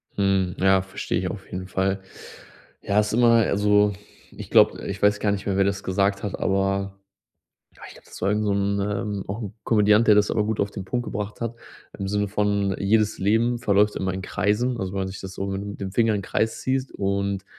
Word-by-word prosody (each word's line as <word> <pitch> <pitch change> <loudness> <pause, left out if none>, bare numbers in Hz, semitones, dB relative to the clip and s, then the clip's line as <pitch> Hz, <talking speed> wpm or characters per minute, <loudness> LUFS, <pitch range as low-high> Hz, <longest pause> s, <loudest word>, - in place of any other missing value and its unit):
Hm, 95 -3 +1
ja, 95 0 +4
verstehe 95 -1 -3
ich 90 0 -2
auf 95 -1 -7
jeden 90 0 -5
Fall. 95 +1 0 0.8
Ja, 100 +1 +1
ist 105 0 0
immer 120 0 +5 0.2
also 105 0 +3 0.4
ich - - -10
glaube - - +4
ich 100 0 -5
weiß 105 0 +3
gar 105 - +1
nicht 100 -1 -3
mehr, 100 -2 -1
wer 100 - +4
das 100 0 -2
gesagt 100 +1 0
hat, 105 - -4
aber, 95 0 0 0.8
ah, - - -15
ich - - -12
glaube, - - -18
das - - -12
war 95 - +1
irgend 105 +1 0
so 105 - +1
'n, 100 0 0
ähm 100 0 -2
auch 100 +5 -4
'n 105 -4 -6
Komödiant, 105 0 +4
der 105 - +7
das 105 0 +3
aber 105 - +1
gut 110 0 -2
auf 100 0 0
den 100 - -6
Punkt 120 +4 -2
gebracht 105 0 -5
hat 115 0 -3 0.4
im 100 - -4
Sinne 105 +1 0
von 100 -1 0
jedes 110 +2 +2
Leben 115 +5 +2
verläuft 105 -2 +2
immer 95 -1 -2
in 95 - -4
Kreisen, 120 +8 0
also 95 -2 -3
wenn 100 - -2
man 95 - -2
sich 95 - -8
das 95 -1 -8
so 95 - -3
mit 100 +1 -5
dem 95 - -4
Finger 115 +2 +2
in 105 - 0
den 100 - -8
Kreis 110 0 -1
ziehst. 130 0 -1
Und 100 0 -2
100 Hz, 230 wpm, -24 LUFS, 95-105 Hz, 0.8 s, der